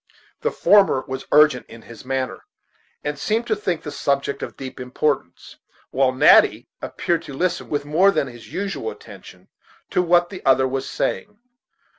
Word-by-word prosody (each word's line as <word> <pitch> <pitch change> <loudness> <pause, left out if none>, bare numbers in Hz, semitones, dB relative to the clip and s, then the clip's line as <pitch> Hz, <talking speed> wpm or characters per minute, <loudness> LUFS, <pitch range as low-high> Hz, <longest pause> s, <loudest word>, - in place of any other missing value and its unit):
The - - +1
former 195 -10 +3
was 130 0 -6
urgent 150 -4 +4
in 115 -1 -13
his 115 - -12
manner, 130 0 -3 0.6
and 145 -1 -4
seemed 225 +8 -1
to 220 - 0
think 185 -5 -3
the 150 - -6
subject 140 0 -1
of - - -7
deep 130 -1 -8
importance, 125 - -3 0.3
while 135 -1 +2
Natty 130 - +5
appeared 170 -1 -2
to 140 - -8
listen 180 +3 -1
with 145 -1 -2
more 165 +7 +4
than 195 - +1
his 120 -3 -12
usual 200 - -3
attention - - -13 0.4
to - - +2
what 175 0 +2
the 190 - -9
other 130 0 +4
was 135 0 -3
saying. 210 0 -3
145 Hz, 165 wpm, -21 LUFS, 130-180 Hz, 0.6 s, Natty